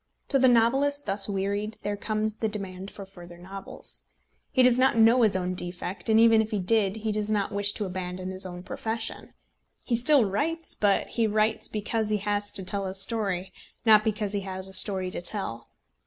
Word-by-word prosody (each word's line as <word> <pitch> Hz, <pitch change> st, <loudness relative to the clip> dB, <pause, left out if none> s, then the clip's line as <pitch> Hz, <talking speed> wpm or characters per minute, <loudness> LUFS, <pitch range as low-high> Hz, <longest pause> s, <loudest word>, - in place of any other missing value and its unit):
To 275 Hz, -, +2 dB
the 260 Hz, -, +5 dB
novelist 270 Hz, +5 st, +2 dB
thus 195 Hz, +1 st, +2 dB
wearied 200 Hz, +2 st, -2 dB
there 205 Hz, 0 st, -2 dB
comes 215 Hz, +1 st, -2 dB
the 220 Hz, -, -1 dB
demand 195 Hz, -2 st, -6 dB
for 200 Hz, -, -10 dB
further 175 Hz, -2 st, -13 dB
novels. 190 Hz, +2 st, -8 dB, 0.4 s
He 260 Hz, -, +3 dB
does 250 Hz, 0 st, +5 dB
not 260 Hz, -2 st, +3 dB
know 230 Hz, +3 st, +5 dB
his 215 Hz, -4 st, +3 dB
own 185 Hz, -1 st, -1 dB
defect, 180 Hz, +3 st, -4 dB
and 220 Hz, 0 st, +5 dB
even 225 Hz, -1 st, +6 dB
if 220 Hz, -, -4 dB
he 215 Hz, -, -2 dB
did 200 Hz, +1 st, +1 dB
he 220 Hz, 0 st, -3 dB
does 210 Hz, 0 st, -1 dB
not 210 Hz, -2 st, 0 dB
wish 205 Hz, 0 st, 0 dB
to 210 Hz, -, -3 dB
abandon 185 Hz, 0 st, -5 dB
his 185 Hz, 0 st, 0 dB
own 180 Hz, -1 st, -5 dB
profession. 225 Hz, +3 st, -4 dB, 0.5 s
He 240 Hz, -, 0 dB
still 250 Hz, +1 st, +5 dB
writes; 320 Hz, -, -1 dB
but 200 Hz, -2 st, +1 dB
he 230 Hz, -2 st, 0 dB
writes 215 Hz, +1 st, +1 dB
because 215 Hz, +1 st, -2 dB
he 210 Hz, -, +1 dB
has 205 Hz, 0 st, -1 dB
to 190 Hz, -, +3 dB
tell 195 Hz, +1 st, 0 dB
a 190 Hz, -, -5 dB
story, 195 Hz, -2 st, -1 dB, 0.3 s
not 215 Hz, -2 st, +6 dB
because 210 Hz, -2 st, -1 dB
he 205 Hz, -, 0 dB
has 190 Hz, 0 st, -4 dB
a 190 Hz, -, -9 dB
story 185 Hz, -1 st, +2 dB
to -, -, -6 dB
tell. 170 Hz, -, -4 dB
205 Hz, 200 wpm, -26 LUFS, 190-225 Hz, 0.5 s, even